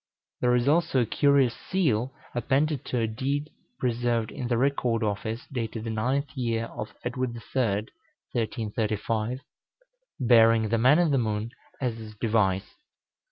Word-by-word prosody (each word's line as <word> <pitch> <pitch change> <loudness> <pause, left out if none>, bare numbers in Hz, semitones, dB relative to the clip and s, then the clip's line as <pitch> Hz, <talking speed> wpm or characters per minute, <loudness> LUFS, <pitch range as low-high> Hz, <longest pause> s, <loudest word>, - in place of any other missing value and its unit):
There 125 0 +3
is 120 +1 +1
also 155 -3 +3
a - - +2
curious 140 0 +3
seal 135 - 0 0.2
appended 135 +5 +1
to 125 - -2
a - - +2
deed 135 +6 -2 0.3
preserved 120 -2 0
in 125 - -4
the 120 -1 +1
Record 125 -3 +1
Office, 110 +3 -2
dated 115 -3 -3
the 115 - -3
9th 130 +6 0
year 115 -4 -1
of - - -6
Edward 125 0 -2
the - - -6
Third 110 -5 0 0.4
(1335), 110 +1 -2 0.8
bearing 115 -2 +5
the 115 +1 +2
man 130 +6 +6
in 175 -3 +3
the 135 - +3
moon 110 0 -2 0.3
as 120 -4 -2
its 110 -1 -10
device. 105 -3 +1
120 Hz, 150 wpm, -27 LUFS, 110-130 Hz, 0.8 s, man